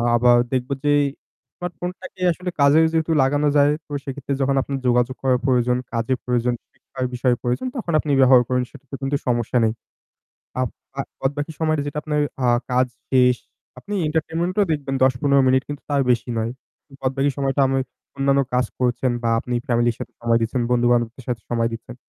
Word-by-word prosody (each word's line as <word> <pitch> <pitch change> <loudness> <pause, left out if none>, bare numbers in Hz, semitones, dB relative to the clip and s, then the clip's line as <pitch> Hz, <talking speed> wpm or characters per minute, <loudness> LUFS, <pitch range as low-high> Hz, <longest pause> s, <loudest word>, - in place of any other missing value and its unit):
আবার 120 0 +5 0.2
দেখব 130 +1 -1 0.2
যে 145 - +4 0.7
স্মার্টফোন 180 0 -4
টাকে 185 - -11
আসলে 180 +2 -4
কাজে 140 +2 +6
যেহেতু 160 0 0
লাগানো 145 +2 +2
যায় 145 0 +5
তো - - -20
সেক্ষেত্রে 140 0 -4
যখন 135 0 +2
আপনার 140 0 -3
যোগাযোগ 125 +1 +2
করার 130 -2 +2
প্রয়োজন, 125 -2 +2 0.2
কাজে 115 +3 0
প্রয়োজন, 125 0 0 0.2
শিক্ষার 130 -1 -6
বিষয়ে 125 0 +2
প্রয়োজন 125 - -1
তখন 220 -9 -3
আপনি 150 - -2
ব্যবহার 130 -1 +7
করুন। 125 0 +1
সেটাতে 140 -1 -10
কিন্তু 135 +1 0
সমস্যা 120 0 +1
নেই। 110 -1 +2 0.9
আব 130 - +1 0.3
আ - - +3 0.2
বদবাকি 145 +3 -2
সময়টা 155 -2 +1
যেটা 145 - -5
আপনার 150 -1 -1 0.3
আ - - +3 0.2
কাজ 125 +1 +3 0.2
শেষ। 125 -1 +4 0.4
আপনি 205 - -7
এন্টারটেইনমেন্ট 165 +3 -1
ও - - +6
দেখবেন 140 -3 -2
১০-১৫ 135 +2 +3
মিনিট 130 0 +3
কিন্তু 145 -1 -5
তার 140 -1 +2
বেশি 120 0 -1
নয়। 115 +1 -1 0.5
বাদবাকি 135 +2 +1
সময়টা 140 0 +1
আমি 135 0 0 0.4
অন্যান্য 140 0 +3
কাজ 125 0 +2
করছেন 125 0 +1
বা 115 - +1
আপনি 125 +1 -3
ফ্যামিলির 120 -1 +2
সাথে - - -7
সময় 115 0 +2
দিচ্ছেন, 120 +2 0
বন্ধু-বান্ধবদের 120 0 +1
সাথে 120 -3 -2
সময় 115 -1 +1
দিচ্ছেন। 115 +1 -8
130 Hz, 175 wpm, -22 LUFS, 125-145 Hz, 0.9 s, ব্যবহার